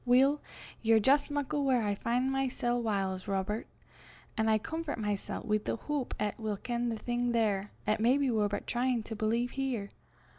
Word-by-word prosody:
"Weel, 265 Hz, +4 st, +4 dB, 0.4 s
ye're 225 Hz, -1 st, +5 dB
jist 280 Hz, +7 st, +4 dB
muckle 290 Hz, 0 st, -1 dB
whaur 255 Hz, -4 st, +3 dB
I 205 Hz, -1 st, +1 dB
fin' 245 Hz, +5 st, 0 dB
mysel' 250 Hz, -2 st, 0 dB
whiles, 195 Hz, -4 st, -1 dB
Robert; 200 Hz, +3 st, -1 dB, 0.7 s
an' 220 Hz, 0 st, +2 dB
I 220 Hz, -, +5 dB
comfort 320 Hz, +6 st, -4 dB
mysel' 210 Hz, -3 st, -3 dB
wi' 215 Hz, -1 st, +1 dB
the 210 Hz, -, -3 dB
houp 290 Hz, 0 st, -3 dB
'at 210 Hz, +1 st, -1 dB
we'll 215 Hz, -2 st, -2 dB
ken 240 Hz, +2 st, -2 dB
the 225 Hz, -, -2 dB
thing 240 Hz, +1 st, -1 dB
there, 210 Hz, -3 st, +1 dB, 0.2 s
'at 215 Hz, -, +1 dB
maybe 260 Hz, +4 st, +3 dB
we're 215 Hz, -2 st, +2 dB
but 205 Hz, 0 st, -3 dB
tryin' 245 Hz, -1 st, 0 dB
to 220 Hz, -, -6 dB
believe 230 Hz, +3 st, 0 dB
here. 255 Hz, -7 st, -2 dB
235 Hz, 180 wpm, -31 LUFS, 210-260 Hz, 0.7 s, ye're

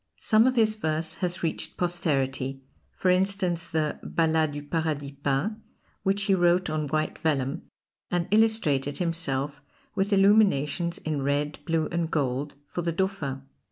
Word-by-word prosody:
Some 220 Hz, +2 st, +4 dB
of 260 Hz, -, +2 dB
his 220 Hz, -2 st, +3 dB
verse 160 Hz, -6 st, -2 dB
has 180 Hz, 0 st, -1 dB
reached 160 Hz, -1 st, -3 dB
posterity, 135 Hz, -6 st, -1 dB, 0.3 s
for 185 Hz, -, +1 dB
instance 185 Hz, -2 st, +1 dB
the 155 Hz, -2 st, -1 dB
"Ballads 160 Hz, -2 st, +1 dB
du 145 Hz, 0 st, -5 dB
Paradis 150 Hz, -2 st, -2 dB
Peint," 145 Hz, +11 st, 0 dB, 0.4 s
which 195 Hz, 0 st, +1 dB
he 195 Hz, -, +3 dB
wrote 175 Hz, -2 st, +3 dB
on 155 Hz, -1 st, -1 dB
white 155 Hz, +2 st, -1 dB
vellum, 135 Hz, -4 st, -1 dB, 0.4 s
and 175 Hz, -1 st, 0 dB
illustrated 205 Hz, -11 st, +2 dB
himself 150 Hz, -5 st, -1 dB, 0.3 s
with 195 Hz, +2 st, 0 dB
illuminations 195 Hz, -5 st, +3 dB
in 155 Hz, -3 st, -3 dB
red, 145 Hz, +2 st, -1 dB
blue 165 Hz, -2 st, +1 dB
and 170 Hz, -1 st, -1 dB
gold, 140 Hz, -1 st, -1 dB
for 175 Hz, -, -4 dB
the 170 Hz, 0 st, -1 dB
Dauphin. 165 Hz, -7 st, -2 dB
165 Hz, 145 wpm, -27 LUFS, 145-185 Hz, 0.4 s, Some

